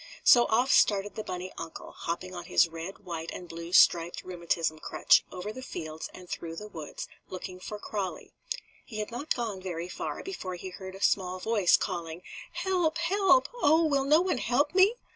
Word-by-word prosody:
So 240 -1 +8
off 245 +4 +2
started 205 0 +4
the 215 - -5
bunny 185 -1 -5
uncle, 160 - -7
hopping 185 +2 -4
on 175 -1 -6
his 170 - +4
red, 165 +5 -8
white 165 -2 -4
and 180 - -7
blue 170 0 -7
striped 170 -1 +5
rheumatism 170 -3 -1
crutch - - +4
over 195 +4 -5
the 255 - -8
fields 160 -10 -6
and 180 - -12
through 165 -1 -5
the 210 +5 -7
woods, 160 -7 -7 0.2
looking 185 0 -7
for 210 +3 -6
Crawlie. 200 -3 -5 0.5
He 220 - -9
had 210 +1 -3
not 260 +6 -1
gone 220 -6 -3
very 175 -2 -4
far - - -4
before 190 - -5
he 185 +2 -7
heard 190 0 -8
a 195 - -6
small 185 -2 +2
voice 205 -2 +4
calling: 170 -2 -4 0.3
"Help! 355 -4 +1
Help! 385 +6 +4
Oh, 320 +3 +5
will 280 -3 +2
no 305 +4 +5
one 365 -8 0
help 275 +7 +1
me?" 385 +5 +5
190 Hz, 185 wpm, -29 LUFS, 175-250 Hz, 0.5 s, So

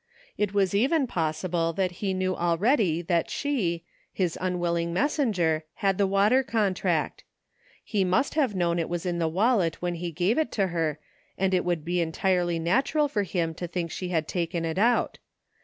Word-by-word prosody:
It 210 -2 0
was 200 -2 +1
even 270 +8 +2
possible 165 -2 -1
that 185 +1 0
he 200 -2 0
knew 185 0 0
already 175 - +1
that 170 -1 0
she, 195 - -1 0.3
his 180 -4 -1
unwilling 170 -2 -1
messenger, 185 - +1
had 195 -1 0
the 200 - +3
water 205 +7 +4
contract. 215 -7 -1 0.6
He 205 -3 0
must 185 +9 +1
have 270 -9 +1
known 170 -1 +1
it 165 - -2
was 175 0 -3
in 175 -1 -1
the 165 - +1
wallet 185 -1 +1
when 175 0 -2
he 170 0 -4
gave 180 - +1
it 315 - 0
to 195 -3 +1
her 165 -3 -1 0.4
and 190 0 +1
it 185 - +2
would 175 -3 -1
be 175 +1 0
entirely 175 +1 0
natural 265 - +1
for 225 -7 -1
him 175 -4 -1
to 175 +2 -5
think 170 -1 -3
she 180 - -4
had 160 -3 0
taken 170 -1 -2
it 165 +2 -2
out. 235 +3 +2
180 Hz, 180 wpm, -26 LUFS, 170-205 Hz, 0.6 s, water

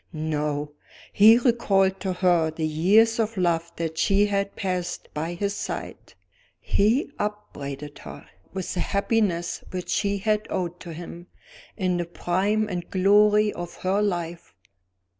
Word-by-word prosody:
No! 150 -2 -2 0.4
he 220 +3 +8
recalled 200 -6 +2
to 190 - -2
her 175 -3 +2
the 160 0 -3
years 205 +9 +3
of 220 -1 -1
love 170 -2 0
that 160 -1 -4
she 200 +3 +3
had 200 -1 -1
passed 180 -2 -3
by 160 +3 -3
his 200 +3 -1
side; - - -6 0.4
he 225 +9 +1
upbraided 150 -9 -5
her 75 0 -10 0.3
with 190 -1 -4
the 180 - -3
happiness 200 -3 0
which 180 -1 -5
she 200 -1 0
had 210 +1 0
owed 175 -1 -3
to 170 -2 -8
him, 175 +1 -9 0.5
in 185 -3 0
the 175 - -1
prime 195 +5 0
and 180 -3 -5
glory 210 +2 +4
of 175 0 -7
her 190 +2 +2
life. 175 - -3
185 Hz, 140 wpm, -25 LUFS, 170-205 Hz, 0.5 s, he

